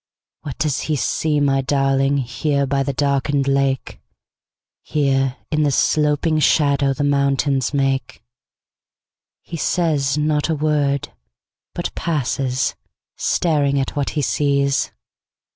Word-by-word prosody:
What 145 -4 -7
does 145 -1 0
he 155 - +2
see, 150 +2 0
my 135 -1 +2
darlingHere 135 +1 0
by 135 0 0
the 140 - -1
darkened 140 0 0
lake? 135 -1 0 0.8
Here, 135 -3 0
in 155 -1 +1
the 150 - +3
sloping 150 +2 +1
shadowThe 140 -2 +2
mountains 140 -1 +1
make? 135 -4 -1 1.2
He 170 - -7
says 150 -5 0
not 150 +1 0
a 160 - +1
word, 145 -2 0 0.7
but - - -3
passes, 135 -4 -1 0.4
Staring 145 -4 +1
at 135 - -3
what 145 -2 -1
he 150 - +1
sees. 140 +4 +1
140 Hz, 110 wpm, -20 LUFS, 135-150 Hz, 1.2 s, the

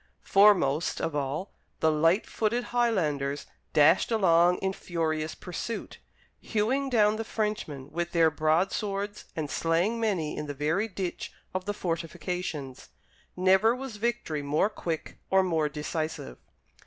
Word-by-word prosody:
Foremost 180 -7 +4
of 160 - -2
all, 145 +6 -2 0.3
the 160 - +3
light 165 +6 +3
footed 230 +3 -1
Highlanders 155 - 0 0.3
dashed 155 +4 +5
along 180 -4 +4
in 190 0 -1
furious 160 -4 -2
pursuit, 190 +6 -6 0.4
hewing 255 +6 0
down 215 -3 +3
the 225 - -2
Frenchmen 210 -12 -3
with 175 0 -2
their 165 -2 +4
broadswords 195 +6 0
and 155 -2 -2
slaying 170 +10 0
many 190 -9 -1
in 150 - -4
the 145 - -5
very 160 +9 0
ditch 185 -4 -5 0.2
of 185 0 -3
the 205 - -1
fortifications. 165 -5 -4 0.5
Never 190 +5 +4
was 255 -4 -7
victory 220 -9 -1
more 145 +8 +1
quick 165 -6 -5
or 190 0 +4
more 160 -4 +1
decisive. 150 - -4
175 Hz, 130 wpm, -28 LUFS, 155-210 Hz, 0.5 s, dashed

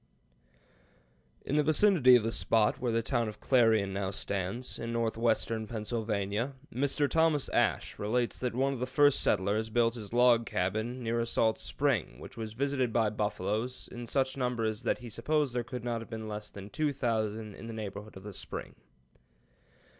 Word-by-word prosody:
] - - -35
In 145 - 0
the - - +5
vicinity 155 -4 +6
of 120 - +4
the 115 - -1
spot 110 -1 +2
where 125 -2 0
the 115 0 +1
town 120 -2 0
of 105 - -10
Clarion 110 -6 +3
now 95 -1 -1
stands, 100 +5 -4
in 115 0 -4
northwestern 115 -1 0
Pennsylvania, 110 +1 -2 0.2
Mr. 140 +3 +1
Thomas 160 -2 +2
Ashe - - 0
relates 120 +3 0
that 125 -2 -2
one 135 +2 +1
of 130 - -5
the 125 - -2
first 145 +1 +4
settlers 105 +4 +1
built 115 0 +2
his 110 -4 -8
log 120 -1 +4
cabin 110 +7 -2
near 115 +1 0
a 115 - -1
salt 110 -1 +1
spring - - -1
which - - -11
was 110 -2 -5
visited 130 -1 0
by 110 -2 +2
buffaloes 105 +4 -2
in 120 -1 -7
such 130 +1 +1
numbers 115 -4 -1
that - - 0
"he 125 -2 -9
supposed 150 +1 0
there 120 -1 -1
could 125 0 -6
not 120 -1 -2
have 115 - -10
been 110 -1 -5
less 105 0 -5
than 100 +1 -10
two 150 +6 0
thousand 110 -5 -2
in 115 - -10
the 115 - -6
neighborhood 105 -1 -7
of 95 - -11
the 105 -1 -8
spring." - - -7
115 Hz, 185 wpm, -31 LUFS, 110-125 Hz, 0.2 s, vicinity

